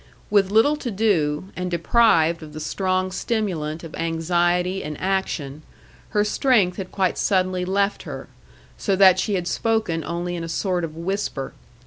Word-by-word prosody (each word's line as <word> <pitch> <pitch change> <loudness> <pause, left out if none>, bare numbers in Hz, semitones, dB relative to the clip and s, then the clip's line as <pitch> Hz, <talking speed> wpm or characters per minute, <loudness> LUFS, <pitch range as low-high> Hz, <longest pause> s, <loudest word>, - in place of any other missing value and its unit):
With 200 -2 +4
little 225 +9 +4
to 260 - -4
do, 190 -6 0
and 180 0 -3
deprived 170 -2 +3
of 155 -1 -10
the 155 - -6
strong 185 +3 -1
stimulant 180 -8 -2
of 165 - -9
anxiety 175 +3 0
and 150 0 -6
action, 170 -7 -2 0.5
her 210 - +2
strength 210 -4 +2
had 190 -3 -6
quite 190 -2 0
suddenly 185 -2 +1
left 200 +2 0
her, - - -8 0.5
so 195 - +1
that 190 -1 +6
she 205 +1 0
had 180 -2 -2
spoken 220 -9 0
only 175 +1 -3
in 170 - -4
a 165 - -5
sort 180 +1 -1
of 160 -1 -5
whisper. 175 -5 -3
185 Hz, 160 wpm, -23 LUFS, 165-200 Hz, 0.5 s, that